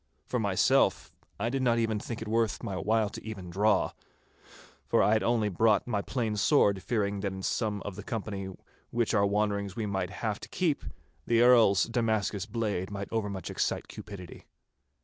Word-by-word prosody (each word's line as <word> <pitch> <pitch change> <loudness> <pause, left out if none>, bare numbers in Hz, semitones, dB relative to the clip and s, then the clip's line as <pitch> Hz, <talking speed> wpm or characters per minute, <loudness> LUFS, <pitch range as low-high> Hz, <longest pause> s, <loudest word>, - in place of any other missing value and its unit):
For - - -1
myself - - +2 0.3
I 115 +3 0
did 135 +2 -1
not 120 -2 +3
even 110 -2 0
think 115 +1 -5
it - - -9
worth 115 +1 0
my 100 -5 -3
while 105 +2 +1
even 105 -4 -7
to 90 - -8
draw—for 100 +2 -2
I 105 - +4
had 110 - +3
only 115 -3 +2
brought 105 +2 +3
my 105 -4 -1
plain 115 -2 -2
sword, 100 -5 +3
fearing 100 -3 -1
that 100 -1 -2
in 95 0 -7
some 105 -2 -1
of 100 - -5
the 105 - -7
company 100 -3 -4 0.4
which 120 -1 0
on 110 - +4
our 100 - +4
wanderings 100 -1 0
we 115 - -2
might 95 -3 -2
have 105 +1 -3
to - - -10
keep, 165 -6 0 0.4
the 115 0 +4
Earl's 115 -6 +6
Damascus 110 -4 0
blade 105 -5 -2
might 100 -1 -5
overmuch 100 -4 -3
excite - - -1
cupidity. 100 -5 -10
105 Hz, 180 wpm, -29 LUFS, 100-115 Hz, 0.4 s, Earl's